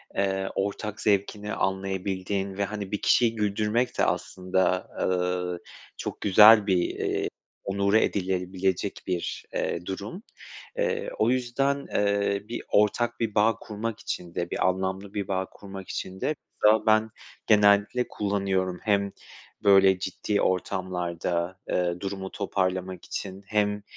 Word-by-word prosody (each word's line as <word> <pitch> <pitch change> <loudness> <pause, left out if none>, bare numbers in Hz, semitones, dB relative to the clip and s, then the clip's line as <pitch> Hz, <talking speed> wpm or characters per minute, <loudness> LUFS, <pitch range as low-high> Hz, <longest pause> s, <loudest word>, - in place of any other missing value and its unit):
eee, 95 -1 0
ortak 100 +2 -3
zevkini 105 0 0
anlayabildiğin 95 0 -2
ve, 100 - +1
hani, 100 -1 -5
bir 105 - -2
kişiyi 115 -2 +3
güldürmek 105 +3 0
de - - +3
aslında, 95 0 0
ııı, 90 -1 0 0.4
çok - - -5
güzel 105 +1 +8
bir, 95 -2 +3
eee, 90 - -1 0.4
onore 100 +2 +2
edilebilecek 95 0 -1
bir, 90 -2 -3
eee, - - -2
durum. 100 - -6 0.5
Eee, 475 -2 0
o 110 - +3
yüzden, 135 +3 0
eee, 100 -1 +1
bir 120 - -4
ortak 120 +3 +2
bir 110 -3 -2
bağ 110 +1 +4
kurmak 110 +1 -5
için 85 -1 -5
de, 85 0 -2
bir - - +1
anlamlı 95 +2 -2
bir 100 -2 -3
bağ 95 -1 -1
kurmak 95 -1 -10
için 95 0 -5
de 155 - 0 0.3
mesela 110 +1 +5
ben 110 0 +4 0.4
genellikle 105 +3 +4
kullanıyorum. 95 -3 -1
Hem 100 -2 +1 0.5
böyle 95 -2 +6
ciddi 100 +3 -1
ortamlarda, 90 -1 -1
eee, 90 -1 0
durumu 95 -1 -5
toparlamak 95 -2 -2
için 95 0 -6
hem, 105 -1 0
100 Hz, 130 wpm, -27 LUFS, 95-105 Hz, 0.5 s, güzel